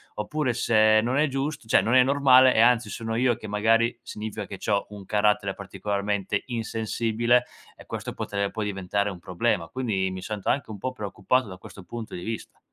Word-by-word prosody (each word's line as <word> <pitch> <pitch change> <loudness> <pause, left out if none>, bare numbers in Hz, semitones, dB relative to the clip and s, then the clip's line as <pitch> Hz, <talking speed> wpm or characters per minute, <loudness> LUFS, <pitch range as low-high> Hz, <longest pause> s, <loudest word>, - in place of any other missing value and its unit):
oppure 130 +4 -1
se 110 -2 +4
non 125 +3 0
è 150 +1 +3
gius 140 +3 -2
cioè - - +5
non 115 - 0
è 130 - +8
normale 130 -2 +5
e 110 - +5
anzi 120 0 +4
sono 115 -1 -4
io 120 0 +2
che 110 - -9
magari 115 +3 +2
significa 110 -3 -6
che 95 - -7
c'ho 100 +1 -1
un 100 -2 -10
carattere 105 -1 +1
particolarmente 100 0 -2
insensibile, 115 +1 0 0.3
e - - -15
questo - - -5
potre 100 -1 -2
può 110 -2 -3
diventare 100 0 -1
un 90 - -9
problema. 90 -1 -1
Quindi 100 -5 -1
mi 95 0 -6
sento 105 -3 -4
anche 135 -4 0
un 105 - -8
po' 130 +6 -3
preoccupato 105 +2 -1
da 95 -2 -9
questo 95 +1 -12
punto 115 +5 -7
di 90 - -7
vista. 115 -1 -6
110 Hz, 195 wpm, -25 LUFS, 100-120 Hz, 0.3 s, è